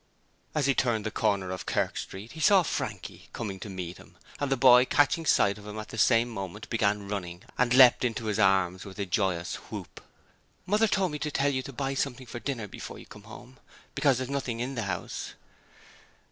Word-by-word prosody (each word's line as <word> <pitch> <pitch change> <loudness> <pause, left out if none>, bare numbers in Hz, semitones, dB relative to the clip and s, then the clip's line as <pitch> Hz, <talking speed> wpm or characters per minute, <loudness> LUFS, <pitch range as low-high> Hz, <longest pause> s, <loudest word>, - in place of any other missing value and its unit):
As 150 -3 +2
he 135 - +3
turned 115 -5 0
the 110 - -2
corner 100 -4 0
of 95 - -6
Kerk - - 0
Street 100 +4 -7
he 160 - -10
saw 195 +2 +5
Frankie 105 - -5
coming 100 -5 -5
to 105 - -7
meet 90 -2 -6
him, - - -17 0.2
and 145 -1 -2
the 135 - +2
boy 125 -1 +7
catching 145 +4 +2
sight 100 -4 +3
of 105 - -12
him 105 +1 -7
at 110 - -7
the 110 - -8
same 115 +1 +4
moment 105 -2 -7
began 105 -3 +1
running 90 -3 -5
and 125 -1 +1
leapt 125 -1 +7
into 115 -2 -1
his 105 -1 -1
arms 95 -2 +3
with 100 -1 -10
a 100 - -2
joyous 90 -2 -1
whoop. - - -8 0.6
'Mother 210 +4 +3
told 190 -3 +1
me 150 - -4
to 150 - -2
tell 140 0 +1
you 130 -1 -1
to 135 - -8
buy 135 +1 -2
something 135 -1 -2
for 120 0 -7
dinner 120 -5 -4
before - - -8
you - - -12
come 105 0 -14
home, 125 +4 -13 0.3
because 140 -4 +3
there's 130 0 -3
nothing 130 -4 -2
in 125 +3 -3
the 115 -5 -3
house.' 90 -2 -5
115 Hz, 215 wpm, -28 LUFS, 100-135 Hz, 0.6 s, boy